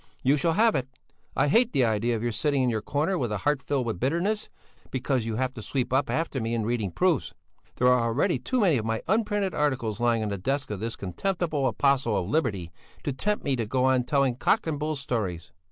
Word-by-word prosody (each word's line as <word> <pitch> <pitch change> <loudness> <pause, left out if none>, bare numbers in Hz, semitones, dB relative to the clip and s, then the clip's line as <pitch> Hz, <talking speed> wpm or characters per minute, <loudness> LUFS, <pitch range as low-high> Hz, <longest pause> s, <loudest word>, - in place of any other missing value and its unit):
You 135 +3 +4
shall 165 +3 +2
have 225 +5 +4
it! 130 -2 -1 0.5
I - - +2
hate 230 - +3
the 130 - +3
idea 115 +2 +1
of 110 - -4
your 120 - 0
sitting 140 +3 +1
in 125 - +2
your 110 -2 -1
corner 155 - 0
with 120 -4 -1
a 105 - 0
heart 145 +7 0
filled 140 -4 -1
with 110 -6 -3
bitterness, 170 - 0 0.4
because 130 -2 -1
you 110 - -2
have 130 +2 -1
to 115 - -8
sweep 130 +2 -2
up 135 +2 +2
after 160 -5 -1
me 115 +1 -1
in 110 -2 -1
reading 115 -4 -1
proofs. 175 - 0 0.4
There 125 - +2
are 125 -1 +5
already 115 +2 +1
too 255 - -1
many 170 - +4
of 110 - -4
my 115 0 -2
unprinted 205 -1 +1
articles 130 -7 -1
lying 120 -2 +2
on 105 - -2
the 100 -1 -3
desk 135 +4 -2
of 105 - -3
this 115 +2 -3
contemptible 150 - -1
apostle 130 -1 +2
of 90 - -2
liberty 100 - -1 0.3
to 145 - -2
tempt 210 +10 -1
me 140 -2 +1
to 115 -3 -2
go 130 +3 +1
on 130 -1 +3
telling 135 -1 +1
cock 210 - +2
and 155 -3 -2
bull 155 +1 -1
stories. 105 - -3
130 Hz, 235 wpm, -26 LUFS, 115-150 Hz, 0.5 s, are